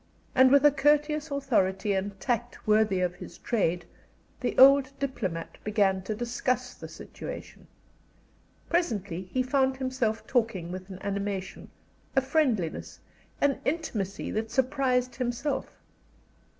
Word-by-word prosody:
And 260 Hz, 0 st, +6 dB
with 280 Hz, +2 st, +5 dB
a 295 Hz, -, +8 dB
courteous 295 Hz, +2 st, +2 dB
authority 215 Hz, -8 st, +1 dB
and 195 Hz, +1 st, -3 dB
tact 240 Hz, 0 st, -2 dB
worthy 210 Hz, -3 st, +3 dB
of 180 Hz, -1 st, 0 dB
his -, -, -10 dB
trade, 180 Hz, -7 st, 0 dB, 0.5 s
the -, -, -2 dB
old 270 Hz, 0 st, +8 dB
diplomat 190 Hz, -12 st, -4 dB
began 200 Hz, -3 st, +2 dB
to 215 Hz, -, -2 dB
discuss 245 Hz, +2 st, -1 dB
the -, -, -9 dB
situation. -, -, -9 dB, 1.0 s
Presently 200 Hz, -, -1 dB
he 255 Hz, -, +1 dB
found 265 Hz, 0 st, +1 dB
himself 255 Hz, -4 st, -1 dB
talking 220 Hz, -9 st, 0 dB
with 185 Hz, +1 st, -7 dB
an 190 Hz, -, -7 dB
animation, 200 Hz, -1 st, -4 dB, 0.5 s
a 270 Hz, -, +5 dB
friendliness, 260 Hz, -, 0 dB, 0.4 s
an 280 Hz, -1 st, +2 dB
intimacy 230 Hz, -, -2 dB
that 220 Hz, +1 st, -2 dB
surprised 255 Hz, 0 st, +1 dB
himself. 255 Hz, +3 st, -2 dB
240 Hz, 125 wpm, -28 LUFS, 195-270 Hz, 1.0 s, a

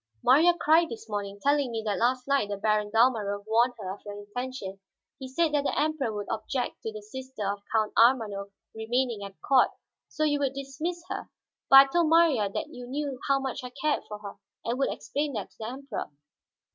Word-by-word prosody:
"Marya 320 Hz, +7 st, +6 dB
cried 325 Hz, +2 st, +4 dB
this 225 Hz, -1 st, -8 dB
morning, 205 Hz, -1 st, -4 dB
telling 285 Hz, -2 st, +2 dB
me 225 Hz, -1 st, -3 dB
that 205 Hz, -2 st, -1 dB
last 250 Hz, +2 st, +1 dB
night 275 Hz, -7 st, +2 dB
the 205 Hz, -, -3 dB
Baron 210 Hz, 0 st, +1 dB
Dalmorov 215 Hz, -3 st, +2 dB
warned 235 Hz, +3 st, +2 dB
her 190 Hz, -3 st, -5 dB
of 205 Hz, -, -13 dB
your 205 Hz, 0 st, -7 dB
intention. 205 Hz, -1 st, -6 dB, 0.4 s
He 265 Hz, -, -6 dB
said 315 Hz, +5 st, +1 dB
that 290 Hz, -1 st, +2 dB
the -, -, 0 dB
Emperor 300 Hz, -6 st, 0 dB
would 205 Hz, -1 st, -4 dB
object 245 Hz, +4 st, -3 dB
to 225 Hz, -, -4 dB
the 215 Hz, -1 st, -8 dB
sister 260 Hz, 0 st, -7 dB
of 200 Hz, 0 st, -2 dB
Count 220 Hz, -1 st, +1 dB
Ormanof 220 Hz, -5 st, +3 dB, 0.2 s
remaining 230 Hz, 0 st, -1 dB
at 195 Hz, -1 st, -9 dB
court, 265 Hz, -2 st, +5 dB, 0.4 s
so 310 Hz, -, -3 dB
you 290 Hz, -1 st, +2 dB
would 275 Hz, -1 st, -1 dB
dismiss 310 Hz, +6 st, -4 dB
her. -, -, -5 dB, 0.4 s
But -, -, +8 dB
I -, -, +4 dB
told 340 Hz, -2 st, +3 dB
Marya 320 Hz, -11 st, +4 dB
that -, -, -4 dB
you 245 Hz, 0 st, -9 dB
knew 275 Hz, 0 st, -3 dB
how 275 Hz, -, +4 dB
much 265 Hz, 0 st, -4 dB
I 250 Hz, -, -5 dB
cared 305 Hz, +1 st, +1 dB
for 210 Hz, -, -6 dB
her, 205 Hz, -1 st, -9 dB, 0.3 s
and 240 Hz, +3 st, -1 dB
would 275 Hz, -, +1 dB
explain 290 Hz, 0 st, -3 dB
that 210 Hz, -4 st, -5 dB
to -, -, -28 dB
the 220 Hz, -, -4 dB
Emperor." 265 Hz, -1 st, -5 dB
245 Hz, 210 wpm, -28 LUFS, 210-275 Hz, 0.4 s, But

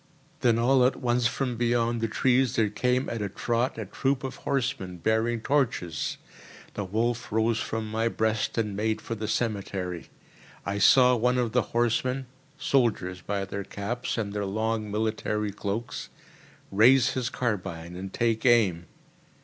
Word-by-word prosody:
Then 115 Hz, -2 st, +3 dB
all 125 Hz, +2 st, +4 dB
at 125 Hz, -, +3 dB
once 120 Hz, -1 st, +1 dB
from 125 Hz, -2 st, -2 dB
beyond 120 Hz, -1 st, +1 dB
the 115 Hz, -, +1 dB
trees 125 Hz, +2 st, +2 dB
there 110 Hz, -3 st, +2 dB
came 125 Hz, +5 st, +1 dB
at 115 Hz, -2 st, -3 dB
a 100 Hz, -, -2 dB
trot 120 Hz, +6 st, -1 dB
a 110 Hz, -, -4 dB
troop 135 Hz, +7 st, -1 dB
of 130 Hz, -, -5 dB
horsemen 115 Hz, -9 st, -2 dB
bearing 110 Hz, +5 st, 0 dB
torches. 115 Hz, -, 0 dB, 0.6 s
The 105 Hz, -, -3 dB
wolf 115 Hz, +5 st, -1 dB
rose 110 Hz, +1 st, +2 dB
from 110 Hz, -1 st, -3 dB
my 110 Hz, +1 st, +1 dB
breast 110 Hz, 0 st, -1 dB
and 105 Hz, -3 st, -1 dB
made 110 Hz, +1 st, 0 dB
for 115 Hz, -, -5 dB
the 110 Hz, -1 st, -4 dB
cemetery. 100 Hz, -6 st, -2 dB, 0.6 s
I 100 Hz, +1 st, -2 dB
saw 125 Hz, +4 st, +6 dB
one 125 Hz, +2 st, +2 dB
of 120 Hz, -3 st, 0 dB
the 125 Hz, -, +3 dB, 0.2 s
horsemen 125 Hz, +3 st, +1 dB, 0.3 s
(soldiers 105 Hz, -11 st, +1 dB
by 100 Hz, +1 st, -2 dB
their 100 Hz, +1 st, -5 dB
caps 105 Hz, +7 st, -4 dB
and 100 Hz, -3 st, -2 dB
their 105 Hz, 0 st, -2 dB
long 110 Hz, +1 st, -1 dB
military 105 Hz, 0 st, -1 dB
cloaks) 100 Hz, +4 st, -4 dB, 0.6 s
raise 125 Hz, +5 st, +5 dB
his 130 Hz, -2 st, -2 dB
carbine 95 Hz, -9 st, -3 dB
and 95 Hz, +1 st, -6 dB
take 115 Hz, 0 st, 0 dB
aim. 105 Hz, -9 st, +3 dB
115 Hz, 155 wpm, -27 LUFS, 105-120 Hz, 0.6 s, saw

